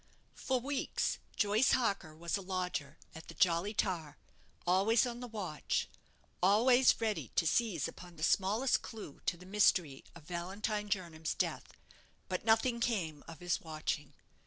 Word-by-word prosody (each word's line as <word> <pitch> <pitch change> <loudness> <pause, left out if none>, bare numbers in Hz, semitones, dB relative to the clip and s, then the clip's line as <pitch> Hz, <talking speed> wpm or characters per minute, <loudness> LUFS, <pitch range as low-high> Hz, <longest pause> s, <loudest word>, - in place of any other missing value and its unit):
For 260 -1 -1
weeks 275 +2 -1 0.2
Joyce 210 +4 +3
Harker 200 -10 0
was 170 +1 -2
a 200 - -2
lodger 180 -6 -3 0.2
at 160 - -11
the - - -10
'Jolly 185 0 +2
Tar'; 170 -8 -1 0.5
always 195 +7 +4
on 240 -1 -4
the 245 - -6
watch; 200 -9 -2 0.5
always 245 +7 +5
ready 220 -3 -1
to 165 - +3
seize 185 - +1
upon 175 -1 -11
the 155 - -7
smallest 210 +10 +2
clue 215 -11 -9
to 175 - +1
the 180 - -13
mystery 185 -8 +2
of 170 - -12
Valentine 200 +5 -3
Jernam's 170 -5 -2
death; - - -2 0.5
but - - -2
nothing 230 +2 +3
came 180 -11 -1
of 165 -1 -10
his 175 -1 0
watching. 155 -2 -4
190 Hz, 150 wpm, -34 LUFS, 165-220 Hz, 0.5 s, always